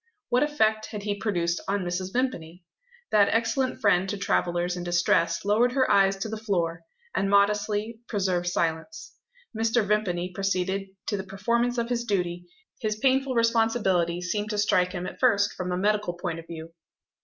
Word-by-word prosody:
What 245 +1 +3
effect 220 -8 +1
had 210 -2 -7
he 205 0 -1
produced 175 -5 -1
on 200 -1 0
Mrs. 180 +1 -3
Vimpany? 185 -9 -3 0.5
That 205 -2 +5
excellent 255 +3 0
friend 190 -2 +3
to 205 - -2
travellers 175 -2 0
in 175 - -5
distress 175 -1 +1
lowered 230 +5 +3
her 260 -1 +2
eyes 195 -1 +4
to 195 +3 -4
the 220 0 -4
floor, 175 -6 -1 0.3
and 195 +2 0
modestly 210 +2 +1
preserved 185 -4 -1
silence. 170 - -2 0.4
Mr. 225 0 +1
Vimpany 185 -4 0
proceeded 195 0 -1 0.2
to 205 - -1
the 190 - -4
performance 235 +6 -1
of 235 0 -1
his 240 -1 -1
duty; 175 -5 -2 0.3
his 215 -3 -1
painful 265 +2 +1
responsibility 225 -7 +2
seemed 205 +4 -2
to 210 - -2
strike 180 -3 +2
him 180 -1 -4
at - - -7
first 205 -5 +3
from 185 -1 -4
a 180 - -1
medical 210 -1 +1
point 175 -1 -4
of 165 - -12
view. 165 0 -9
200 Hz, 170 wpm, -26 LUFS, 180-220 Hz, 0.5 s, That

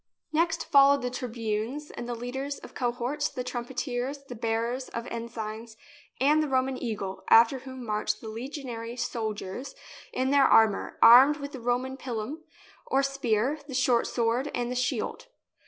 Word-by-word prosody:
Next 330 +1 +1
followed 280 -1 +5
the 250 - -2
tribunes 235 +3 -3
and 240 - -7
the 240 - -2
leaders 265 +4 -4
of - - -12
cohorts, 245 +4 -1
the 250 - -5
trumpeters, 250 +2 -4
the 270 - -9
bearers 230 +3 -2
of 230 0 -5
ensigns 225 -1 -6 0.4
and 295 +4 +4
the 305 - 0
Roman 260 -1 +1
eagle, 205 -5 -4
after 235 +4 +6
whom 260 -1 -9
marched 210 -1 -1
the 225 - -9
legionary 235 0 -6
soldiers 235 0 -4 0.4
in 260 +1 0
their 280 -1 +5
armour, 220 -5 +4
armed 265 +6 +9
with 280 -1 -6
the 265 - -7
Roman 250 +2 -1
pilum, 255 +4 -5 0.4
or 270 +1 +2
spear, 275 0 0
the 265 - -6
short 250 -2 +3
sword, 240 +4 0
and 245 0 -2
the - - -3
shield. 250 - -2
245 Hz, 155 wpm, -28 LUFS, 230-275 Hz, 0.4 s, armed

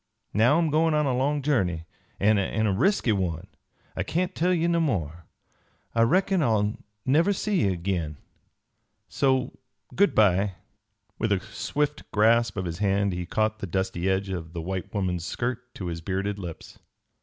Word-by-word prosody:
"Now 120 +8 +4
I'm 165 -3 +1
goin' 160 +1 +3
on 150 0 +2
a 130 -3 +1
long 140 +3 0
journey, 90 - 0 0.3
an' 105 +1 +4
a 105 +1 0
resky 130 - +2
one; 90 -5 -2 0.5
I - - -1
kain't 180 +2 -1
tell 180 +1 +1
ye 170 -2 +2
no 170 0 +2
more. 85 - -2 0.7
I 115 - +2
reckon 185 +9 +3
I'll 110 -5 +1 0.3
never 160 +9 +3
see 200 -2 0
ye 95 - +2
agin. 85 -4 -2 0.9
So 130 -2 0 0.4
good 200 +2 +3
by." 100 -2 +3 0.6
With 110 -1 0
a 100 - +3
swift 140 +10 -3
grasp 115 +1 +3
of 95 - -2
his 85 +1 -4
hand 100 -1 +1
he 90 0 -4
caught 110 +2 0
the 100 - -4
dusty 95 0 -1
edge 95 +1 0
of 85 -3 -5
the 85 - -4
white 95 +2 -4
woman's 90 -4 -1
skirt 125 +1 -3
to 95 - -6
his 85 -1 -4
bearded 100 +3 -2
lips. 85 -4 -9
105 Hz, 165 wpm, -26 LUFS, 95-140 Hz, 0.9 s, Now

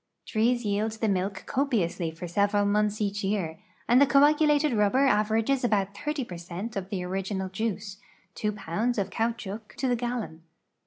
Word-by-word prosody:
Trees 240 +2 +1
yield 210 +2 0
the 220 0 -1
milk 190 0 -1
copiously 210 - 0
for 165 +3 -7
several 205 +3 +2
months 210 +1 +1
each 205 -1 -1
year, 190 -5 -1 0.3
and 245 +3 +5
the 285 - +6
coagulated 295 +1 +4
rubber 215 +6 +3
averages 225 +3 +2
about 200 -4 +1
.')0 285 +3 -3
per 175 - -7
cent 175 +6 -6
of 195 -1 -4
tlu; 185 -3 -3
original 190 0 -3
juici", 200 -1 -3 0.4
two 210 - -1
pounds 210 +5 -2
of 195 -1 -1
caoutchouc 225 -1 -3
to 265 - -1
the 245 - +2
gallon. 235 -9 -4
210 Hz, 165 wpm, -27 LUFS, 195-240 Hz, 0.4 s, the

